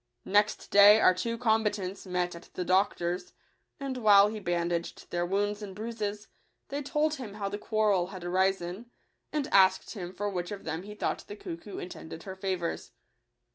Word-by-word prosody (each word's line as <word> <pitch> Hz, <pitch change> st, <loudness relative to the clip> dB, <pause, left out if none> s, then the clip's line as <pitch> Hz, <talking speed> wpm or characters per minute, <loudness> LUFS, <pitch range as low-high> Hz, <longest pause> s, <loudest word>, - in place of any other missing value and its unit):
Next 205 Hz, +2 st, +1 dB
day 205 Hz, +2 st, +9 dB
our 185 Hz, -, +6 dB
two 230 Hz, +6 st, -2 dB
combatants 210 Hz, -5 st, 0 dB
met 180 Hz, -1 st, -1 dB
at 170 Hz, 0 st, -12 dB
the 180 Hz, -, -2 dB
doctor's; 180 Hz, -1 st, +1 dB, 0.5 s
and, 270 Hz, -2 st, -4 dB
while 205 Hz, -3 st, +6 dB
he 215 Hz, 0 st, -5 dB
bandaged 170 Hz, -2 st, -2 dB
their 175 Hz, 0 st, 0 dB
wounds 205 Hz, +2 st, 0 dB
and 195 Hz, -2 st, -7 dB
bruises, 210 Hz, -1 st, -4 dB, 0.4 s
they 285 Hz, +1 st, -3 dB
told 300 Hz, +2 st, 0 dB
him 220 Hz, -6 st, -7 dB
how 200 Hz, -2 st, -3 dB
the 205 Hz, +1 st, -5 dB
quarrel 210 Hz, -5 st, +1 dB
had 185 Hz, -2 st, -9 dB
arisen, 190 Hz, +3 st, 0 dB, 0.4 s
and 300 Hz, -3 st, -1 dB
asked 190 Hz, -1 st, +4 dB
him 180 Hz, -5 st, -6 dB
for 205 Hz, +2 st, -3 dB
which 180 Hz, -3 st, -3 dB
of 205 Hz, -, -6 dB
them 160 Hz, +1 st, -3 dB
he 210 Hz, +2 st, -9 dB
thought -, -, -2 dB
the 205 Hz, -, -7 dB
cuckoo 190 Hz, 0 st, -8 dB
intended 165 Hz, -2 st, -8 dB
her 190 Hz, -1 st, -7 dB
favours. 185 Hz, -3 st, -3 dB
200 Hz, 175 wpm, -29 LUFS, 180-210 Hz, 0.5 s, day